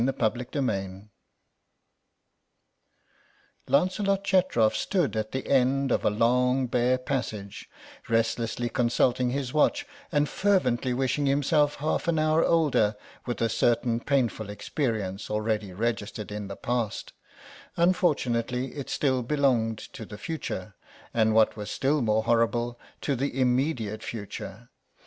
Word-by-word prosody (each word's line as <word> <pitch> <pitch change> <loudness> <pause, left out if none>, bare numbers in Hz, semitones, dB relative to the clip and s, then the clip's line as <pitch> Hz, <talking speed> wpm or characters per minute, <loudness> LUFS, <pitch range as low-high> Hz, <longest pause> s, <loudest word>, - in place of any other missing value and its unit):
CHAPTER 125 +1 -1
II 95 -5 -3 2.6
LANCELOT 190 +7 +2
CHETROF 180 - +2
stood 180 - 0
at 110 0 -2
the 130 - -4
end 135 0 +2
of - - +1
a - - +4
long 125 +4 +2
bare 125 +1 +2
passage, 110 -7 -4 0.4
restlessly 115 +1 0
consulting 125 +1 +1
his 130 -1 -3
watch 290 - +2 0.3
and 145 -2 +2
fervently 135 -10 +1
wishing 135 +2 0
himself 145 +1 +2
half 155 +3 -2
an 170 -1 +2
hour 155 +1 +3
older 145 -10 +2 0.3
with 120 -1 -2
a - - +3
certain 115 +1 +1
painful 120 -6 0
experience 105 - -3
already 105 -2 -1
registered 105 +1 -3
in 105 -1 -5
the 100 - -6
past; 120 -3 -2 0.6
unfortunately 130 -8 +1
it 140 -3 -6
still 130 -3 +1
belonged 125 -4 +1
to 110 - -9
the 105 - -9
future, 105 - -5 0.4
and 110 -1 +2
what 110 -1 +4
was 105 -1 -6
still 145 +2 +1
more 110 -1 +2
horrible, 120 +1 +1 0.2
to 140 - 0
the 135 +1 -2
immediate 125 -4 0
future. 110 +1 -7
125 Hz, 125 wpm, -27 LUFS, 110-140 Hz, 2.6 s, a